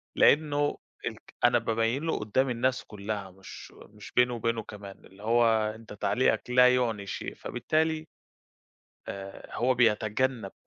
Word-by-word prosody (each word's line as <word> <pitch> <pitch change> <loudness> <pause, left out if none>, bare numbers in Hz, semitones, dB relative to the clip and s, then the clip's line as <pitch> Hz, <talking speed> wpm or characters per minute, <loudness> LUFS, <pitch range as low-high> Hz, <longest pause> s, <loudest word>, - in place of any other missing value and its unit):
لأنه 145 -1 +3 0.3
الك - - -8
أنا 120 0 +5
بابين 115 +5 0
له 165 - -1
قدام 130 +6 +1
الناس 125 +1 0
كلها 100 -2 -5
مش 95 +1 -11 0.2
مش 105 -1 -12
بيني 125 0 +3
وبينه، 115 -1 -1
كمان، 100 -2 -11
اللي 95 +2 -16
هو 120 +2 +4 0.3
أنت 110 -1 -11
تعليقك 110 +1 +1
لا 125 0 +6
يُعني 115 -5 0
شيء، - - -5
فبالتالي 155 +5 -1 1.0
آآ، 95 0 -8
هو 125 +3 +2
بيتجنب 115 -1 +1
115 Hz, 135 wpm, -28 LUFS, 105-125 Hz, 1.0 s, لا